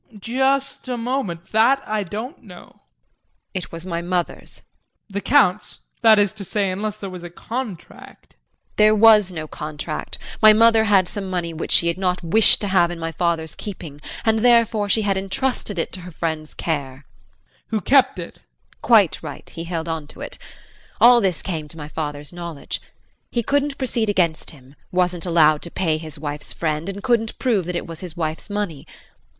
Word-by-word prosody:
JEAN. 215 Hz, -4 st, -15 dB
Just 265 Hz, +6 st, 0 dB
a 250 Hz, -, -2 dB
moment, 230 Hz, -8 st, -3 dB
that 250 Hz, +6 st, +4 dB
I 215 Hz, 0 st, -1 dB
don't 215 Hz, -, -6 dB
know. 180 Hz, -3 st, -13 dB
JULIE. -, -, -28 dB, 0.8 s
It 185 Hz, -2 st, -5 dB
was 165 Hz, +1 st, -7 dB
my 170 Hz, -2 st, -3 dB
mother's. 175 Hz, 0 st, -3 dB
JEAN. -, -, -11 dB, 0.5 s
The 200 Hz, +1 st, -3 dB
Count's 210 Hz, -8 st, +2 dB, 0.2 s
that 220 Hz, -2 st, +7 dB
is 205 Hz, -1 st, +2 dB
to 210 Hz, -2 st, -8 dB
say, 200 Hz, 0 st, 0 dB
unless 210 Hz, +2 st, -3 dB
there 200 Hz, -, -6 dB
was 180 Hz, -1 st, -8 dB
a 175 Hz, -, -8 dB
contract. 220 Hz, +1 st, -8 dB
JULIE. -, -, -40 dB
There 215 Hz, 0 st, +6 dB
was 215 Hz, -3 st, +6 dB
no 160 Hz, -3 st, -6 dB
contract. 150 Hz, +1 st, -5 dB, 0.2 s
My 215 Hz, -1 st, +9 dB
mother 225 Hz, 0 st, +5 dB
had 195 Hz, -3 st, +4 dB
some 195 Hz, +1 st, -4 dB
money 175 Hz, -2 st, -2 dB
which 160 Hz, -, -5 dB
she 170 Hz, -, +6 dB
had 170 Hz, +2 st, -1 dB
not 180 Hz, -1 st, 0 dB
wished 210 Hz, +7 st, +5 dB
to 205 Hz, -, -1 dB
have 175 Hz, -3 st, +4 dB
in 175 Hz, -, -5 dB
my 165 Hz, 0 st, -4 dB
father's 160 Hz, -1 st, -1 dB
keeping 165 Hz, -8 st, -8 dB, 0.2 s
and 220 Hz, 0 st, +3 dB
therefore, 230 Hz, -3 st, +3 dB
she 220 Hz, +2 st, +3 dB
had 195 Hz, -1 st, +1 dB
entrusted 195 Hz, +2 st, -2 dB
it 165 Hz, -, -2 dB
to 185 Hz, -, -6 dB
her 180 Hz, +1 st, -9 dB
friend's 160 Hz, -1 st, -4 dB
care. 140 Hz, -4 st, -3 dB
JEAN. -, -, -36 dB, 0.2 s
Who 220 Hz, -2 st, -1 dB
kept 270 Hz, -7 st, +4 dB
it. 170 Hz, -1 st, -7 dB
JULIE. -, -, -33 dB
Quite -, -, +4 dB
right -, -, -8 dB
he 165 Hz, -, -7 dB
held 165 Hz, -1 st, -4 dB
on 160 Hz, -3 st, -4 dB
to -, -, -12 dB
it. -, -, -7 dB, 0.6 s
All 240 Hz, 0 st, +7 dB
this 185 Hz, -6 st, 0 dB
came 160 Hz, -5 st, -4 dB
to 160 Hz, -, -11 dB
my 150 Hz, -2 st, -7 dB
father's 150 Hz, 0 st, -5 dB
knowledge. 170 Hz, -4 st, -5 dB, 0.5 s
He 235 Hz, -, -1 dB
couldn't 285 Hz, +2 st, 0 dB
proceed 235 Hz, -4 st, 0 dB
against 175 Hz, -5 st, +1 dB
him, 135 Hz, -3 st, -13 dB, 0.2 s
wasn't 180 Hz, -1 st, 0 dB
allowed 155 Hz, -3 st, +4 dB
to 170 Hz, -, -7 dB
pay 160 Hz, -3 st, 0 dB
his 155 Hz, -1 st, -8 dB
wife's 145 Hz, 0 st, -5 dB
friend, 155 Hz, +2 st, -2 dB
and 200 Hz, +1 st, -6 dB
couldn't 230 Hz, -3 st, +1 dB
prove 220 Hz, -9 st, +1 dB
that 180 Hz, -, -3 dB
it -, -, -3 dB
was 165 Hz, -1 st, -8 dB
his 175 Hz, -3 st, -8 dB
wife's 160 Hz, +3 st, -3 dB
money. 205 Hz, -8 st, -4 dB
185 Hz, 195 wpm, -21 LUFS, 165-215 Hz, 0.8 s, My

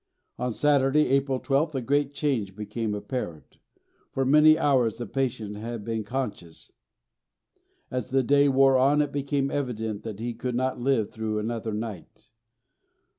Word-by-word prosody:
On 125 Hz, 0 st, -1 dB
Saturday, 145 Hz, +3 st, +3 dB
April 135 Hz, -1 st, +1 dB
12th, 145 Hz, +3 st, 0 dB
a 130 Hz, -, -1 dB
great 140 Hz, +3 st, +1 dB
change 125 Hz, -10 st, -2 dB
became 105 Hz, +1 st, -3 dB
apparent. 100 Hz, -, -6 dB, 0.5 s
For 135 Hz, -, -1 dB
many 150 Hz, +3 st, +6 dB
hours 130 Hz, -8 st, +2 dB
the 120 Hz, -, -4 dB
patient 115 Hz, -4 st, -2 dB
had 115 Hz, 0 st, -6 dB
been 115 Hz, -1 st, -2 dB
unconscious. 105 Hz, -7 st, -5 dB, 1.2 s
As 125 Hz, 0 st, -3 dB
the 135 Hz, 0 st, +2 dB
day 140 Hz, +3 st, +4 dB
wore 135 Hz, -1 st, +5 dB
on, 145 Hz, +3 st, +4 dB
it 145 Hz, -, -5 dB
became 140 Hz, -1 st, -1 dB
evident 110 Hz, -6 st, -3 dB
that 110 Hz, -3 st, -7 dB
he 120 Hz, +1 st, -3 dB
could 120 Hz, +1 st, -4 dB
not 130 Hz, +1 st, -1 dB
live 120 Hz, -5 st, +1 dB
through 110 Hz, -1 st, -3 dB
another 110 Hz, +1 st, -3 dB
night. 105 Hz, -4 st, -7 dB
125 Hz, 150 wpm, -26 LUFS, 110-140 Hz, 1.2 s, many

